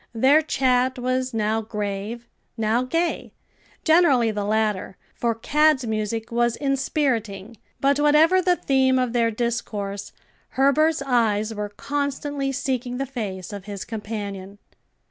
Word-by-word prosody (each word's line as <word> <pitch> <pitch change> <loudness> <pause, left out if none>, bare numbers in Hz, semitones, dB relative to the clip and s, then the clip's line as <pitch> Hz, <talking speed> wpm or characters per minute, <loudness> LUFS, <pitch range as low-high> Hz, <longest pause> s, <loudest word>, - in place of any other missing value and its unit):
Their 270 +7 +5
chat 260 -3 +1
was 255 +1 -1
now 220 -1 0
grave, 210 +2 -5 0.3
now 225 +2 +1
gay 330 +7 -2 0.5
generally 295 -9 +4
the 205 -1 -3
latter; 210 -3 -1 0.2
for 235 -1 -1
Cad's 295 +3 +2
music 220 +1 -3
was 240 0 +1
inspiriting; 240 -7 -1 0.2
but 280 +1 +2
whatever 310 +5 +5
the 360 0 +3
theme 265 -4 +2
of 250 -2 0
their 235 -1 +2
discourse, 215 -3 -3 0.5
Herbert's 290 +3 +3
eyes 225 -4 +1
were 210 -1 -4
constantly 280 +3 -3
seeking 255 -2 -2
the 275 - -2
face 205 -8 -6
of 200 -2 -7
his 200 -2 -6
companion. 205 -3 -6
240 Hz, 125 wpm, -23 LUFS, 215-275 Hz, 0.5 s, Their